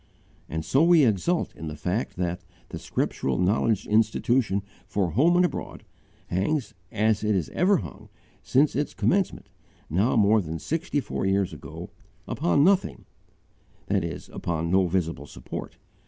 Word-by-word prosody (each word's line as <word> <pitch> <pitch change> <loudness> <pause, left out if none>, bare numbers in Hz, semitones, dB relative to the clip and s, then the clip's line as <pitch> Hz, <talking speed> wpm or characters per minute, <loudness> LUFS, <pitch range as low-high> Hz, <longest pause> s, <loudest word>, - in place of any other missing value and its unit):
And 80 0 -4
so 135 - +3
we 170 -4 +6
exult 120 - 0
in 80 - -7
the 75 - -5
fact 90 +9 -2
that 90 -1 -3 0.3
'the - - -6
Scriptural 65 - -2
Knowledge 100 +3 +1
Institution 110 -1 +1 0.2
for 95 -4 -1
Home 155 - +4
and 180 0 +5
Abroad' - - -5 0.4
hangs, 115 - -1 0.2
as 110 0 +1
it 105 -1 +2
has 90 -6 -1
ever 195 +3 +3
hung, 85 - -9 0.3
since 140 +3 +2
its 145 +1 -2
commencement, 195 0 0 0.4
now 100 - +2
more 110 -1 +4
than 80 -2 -5
sixty 155 - -2
four 95 - -3
years 95 -1 +1
ago, - - -9 0.4
'upon 90 +11 +2
nothing,' 195 +2 +2 0.8
that - - 0
is, - - -5
upon 85 0 -3
no 95 0 +4
VISIBLE 85 -5 -2
support. - - -8
105 Hz, 150 wpm, -26 LUFS, 90-140 Hz, 0.8 s, we